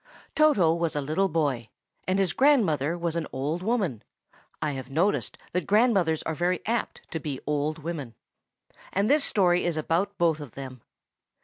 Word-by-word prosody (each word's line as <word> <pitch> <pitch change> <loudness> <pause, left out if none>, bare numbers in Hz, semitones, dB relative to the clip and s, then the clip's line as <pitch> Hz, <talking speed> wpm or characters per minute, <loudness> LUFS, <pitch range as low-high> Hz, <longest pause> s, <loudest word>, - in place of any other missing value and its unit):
TOTO 250 - +4
was 170 -2 -1
a - - +1
little 155 +8 0
boy, 140 -8 -1 0.4
and 185 +1 +1
his 190 -3 +1
grandmother 175 - +3
was 170 -1 -2
an 165 -2 -2
old 145 +6 -2
woman 190 - -1 0.6
(I 150 - -1
have 130 -2 -6
noticed 170 +9 0
that 180 - -2
grandmothers 200 -7 +3
are 160 - -2
very 175 +3 0
apt 230 +1 -2
to 160 - -2
be 145 -3 -4
old 150 +1 -1
women); 145 -9 -5 0.8
and 200 +6 +1
this 295 0 +4
story 180 -7 +3
is 170 -2 0
about 175 +6 0
both 165 -3 +2
of 145 -6 -9
them. 130 -3 -8
165 Hz, 170 wpm, -27 LUFS, 150-195 Hz, 0.8 s, TOTO